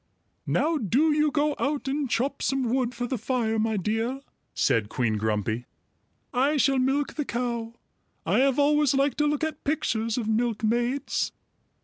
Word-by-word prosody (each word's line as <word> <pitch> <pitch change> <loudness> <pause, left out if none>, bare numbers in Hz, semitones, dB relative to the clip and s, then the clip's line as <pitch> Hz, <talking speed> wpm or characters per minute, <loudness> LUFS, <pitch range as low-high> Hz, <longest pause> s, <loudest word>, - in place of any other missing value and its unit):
"Now 320 0 +1
do 270 - +2
you 300 0 +3
go 295 0 +1
out 285 -1 -1
and 275 0 -1
chop 275 +4 -1
some 260 -3 0
wood 250 -2 0
for 245 +1 -2
the 245 -1 -3
fire, 225 -1 0
my 220 0 0
dear," 225 +7 -1 0.3
said 105 -2 +1
Queen 115 -3 0
Grumpy. 110 +2 -1 0.7
"I 275 +4 +2
shall 275 -1 +3
milk 270 +3 +1
the 300 - -2
cow. 235 -1 -3 0.5
I - - +2
have 270 -1 +3
always 295 -1 +3
liked 275 +2 +1
to 295 - +3
look 295 +1 -1
at 315 -1 -3
pictures 230 -6 -1
of 230 -3 -2
milkmaids." 235 +4 0
255 Hz, 160 wpm, -26 LUFS, 225-285 Hz, 0.7 s, you